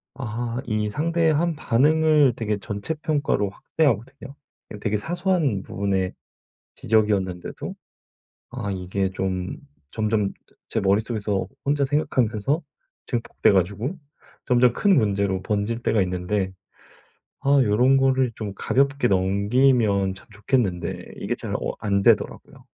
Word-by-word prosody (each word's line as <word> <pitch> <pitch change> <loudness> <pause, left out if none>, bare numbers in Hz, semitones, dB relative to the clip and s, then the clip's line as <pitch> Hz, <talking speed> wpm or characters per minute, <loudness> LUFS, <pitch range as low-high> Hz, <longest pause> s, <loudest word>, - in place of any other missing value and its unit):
아 120 -1 -4
이 105 -2 -1
상대의 165 +5 +1
한 165 +2 +1
반응을 150 +2 +4
되게 105 -2 -1
전체 100 +8 -4
평가로 150 -9 0
확대하거든요. 135 +3 -2 0.5
되게 105 +1 0
사소한 170 - 0
부분의 95 -2 -1 0.6
지적이었는데도 100 -5 0 0.8
아 120 -6 -4
이게 95 +1 -2
좀 95 -1 -3 0.3
점점 105 -2 0 0.4
제 - - -1
머릿속에서 105 -1 0 0.2
혼자 140 0 +2
생각하면서 135 0 0 0.4
증폭돼 120 -4 +1
가지고 105 - 0 0.5
점점 125 -1 +4
큰 195 +8 +3
문제로 100 -3 +1
번질 105 +4 -2
때가 110 - +2
있는데 95 +1 -2 0.9
아 140 - 0
요런 125 +5 +4
거를 130 -2 +2
좀 105 -3 -5
가볍게 140 -1 +1
넘기면 100 +1 +2
참 95 - -16
좋겠는데 105 -4 -1
이게 - - -3
잘 - - -5
어 - - -2
안 100 -1 0
되더라고요. - - +1
110 Hz, 270 characters per minute, -24 LUFS, 100-135 Hz, 0.9 s, 반응을